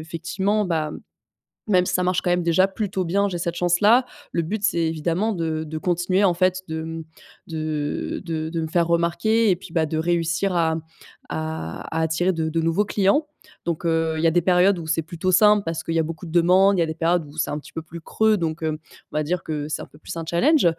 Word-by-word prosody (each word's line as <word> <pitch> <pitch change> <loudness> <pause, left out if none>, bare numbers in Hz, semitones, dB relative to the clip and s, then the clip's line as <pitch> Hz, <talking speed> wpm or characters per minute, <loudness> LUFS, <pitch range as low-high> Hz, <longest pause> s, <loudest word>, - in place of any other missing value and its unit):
effectivement, 175 +6 -1
bah 160 -4 -1
mmh, - - -7 0.7
même 180 -3 +3
si - - -2
ça 180 - +2
marche 180 0 +1
quand 180 - -1
même 175 0 +2
déjà 170 +3 +3
plutôt 195 -2 -3
bien, 200 +4 +1
j'ai 180 - -3
cette 170 0 -2
chance-là. 205 +9 +4 0.3
Le 170 - 0
but, 205 +5 -4
c'est 170 - +2
évidemment 165 +6 0
de 160 -3 -2
de 155 0 -6
continuer, 180 +3 +1
en 185 -3 +4
fait, 185 +1 +1
de, 160 0 -4
mmh, 160 0 -6 0.4
de 155 -2 -3
de 160 -3 -3
de 165 0 -2
me 160 - -2
faire 170 +1 +1
remarquer 170 +7 +2
et 185 - +4
puis, 175 -1 -13
bah, 160 -2 +2
de 155 +1 -3
réussir 170 +3 0
à, 165 -2 +2
mmh, 160 - -4 0.5
à 155 - -4 0.2
à - - +1
attirer 160 +3 +1
de 160 -1 -1
de 165 +1 0
nouveaux 165 +6 +1
clients. 210 +11 +2 0.4
Donc 170 0 -2
heu, 165 -1 +1
il 155 - -2
y 165 - +5
a - - +4
des 175 - +3
périodes 180 +2 +3
où 160 - -7
c'est 165 +1 +1
plutôt 170 +3 -2
simple 210 +1 +5
parce 165 -1 -3
qu'il 165 - -3
y - - +3
a - - +3
beaucoup 160 +2 -6
de 160 - -8
demandes. 185 +3 +4
Il - - +1
y - - +4
a - - +1
des 160 - -4
périodes 165 0 +1
où 145 +1 -14
c'est - - 0
un 150 - -2
petit - - -15
peu 160 - -4
plus 165 +1 -10
creux, 220 +5 +2
donc 165 -2 -3
hem, 155 -1 -1 0.3
on - - -3
va 155 - +1
dire 170 +3 -2
que 150 -2 -3
c'est 155 - -3
un - - -7
peu - - -19
plus 155 - -8
un 165 - -4
challenge. 260 - +3
170 Hz, 255 wpm, -23 LUFS, 160-185 Hz, 0.7 s, y